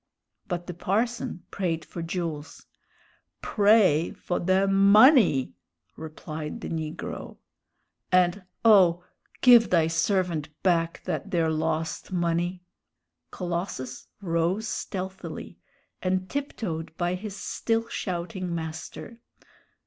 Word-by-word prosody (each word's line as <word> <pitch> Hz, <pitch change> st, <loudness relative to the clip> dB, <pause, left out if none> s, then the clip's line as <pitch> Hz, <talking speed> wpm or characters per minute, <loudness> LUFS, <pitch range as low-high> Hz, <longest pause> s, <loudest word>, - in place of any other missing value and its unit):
But 175 Hz, -1 st, -3 dB
the 180 Hz, -, -6 dB
parson 210 Hz, +2 st, -2 dB
prayed 170 Hz, -4 st, -2 dB
for 170 Hz, -, -7 dB
Jules. 165 Hz, -3 st, -5 dB, 0.8 s
"Pray 200 Hz, -7 st, +4 dB
fo' 175 Hz, -, -3 dB
de 190 Hz, +2 st, +2 dB
money!" 200 Hz, -, +6 dB, 0.4 s
repeated 155 Hz, -1 st, -7 dB
the -, -, -5 dB
negro. 160 Hz, -1 st, -5 dB, 0.7 s
"And 185 Hz, +1 st, +3 dB, 0.2 s
oh, 180 Hz, -6 st, +6 dB, 0.4 s
give 240 Hz, -3 st, +7 dB
thy 165 Hz, -3 st, +4 dB
servant 165 Hz, -1 st, 0 dB
back 170 Hz, -2 st, +1 dB
that 200 Hz, -, -3 dB
there 165 Hz, -4 st, +1 dB
lost 160 Hz, +2 st, -2 dB
money!" 175 Hz, 0 st, -1 dB, 0.7 s
Colossus 170 Hz, -8 st, -4 dB, 0.2 s
rose 175 Hz, +5 st, 0 dB
stealthily, 190 Hz, -2 st, -6 dB, 0.4 s
and 185 Hz, 0 st, 0 dB
tiptoed 180 Hz, -, -4 dB
by 175 Hz, 0 st, 0 dB
his 195 Hz, +2 st, -5 dB
still 225 Hz, +3 st, -1 dB
shouting 180 Hz, -3 st, -4 dB
master. 160 Hz, +8 st, -7 dB
175 Hz, 100 wpm, -26 LUFS, 165-195 Hz, 0.8 s, give